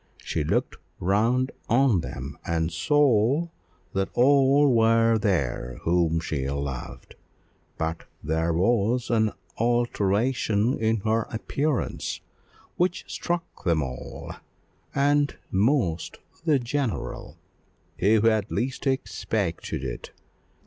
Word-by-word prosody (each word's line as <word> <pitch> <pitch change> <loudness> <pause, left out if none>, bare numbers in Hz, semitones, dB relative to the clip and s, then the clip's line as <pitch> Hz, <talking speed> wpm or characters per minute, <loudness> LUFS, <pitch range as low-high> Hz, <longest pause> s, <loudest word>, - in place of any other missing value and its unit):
She 80 - -1
looked 75 - -1 0.2
round 115 +8 +2 0.2
on 120 -4 +4
them, 65 - -6
and 80 0 -1
saw 145 - +3 0.4
that 95 0 0
all 140 +1 +5
were 115 0 +4
there 70 - -1
whom 85 -1 +2
she 70 -4 -3
loved; 70 -2 -5 0.6
but 80 0 -3 0.2
there 80 +2 0
was 115 +7 +1
an 110 -2 +3 0.3
alteration 120 0 +1
in 110 -1 +1
her 110 +1 0
appearance 135 +4 -2 0.6
which 180 +1 0
struck 175 0 -4
them 85 -5 +2
all, 65 -2 -7 0.6
and 145 +1 +2 0.2
most 95 - +1 0.3
the 155 -4 +4
general, 125 -3 -3 0.6
who 105 +3 +4
had 110 -2 +2
least 130 +3 -2
expected 105 - -2
it. 65 -2 -5
110 Hz, 100 wpm, -26 LUFS, 85-130 Hz, 0.6 s, all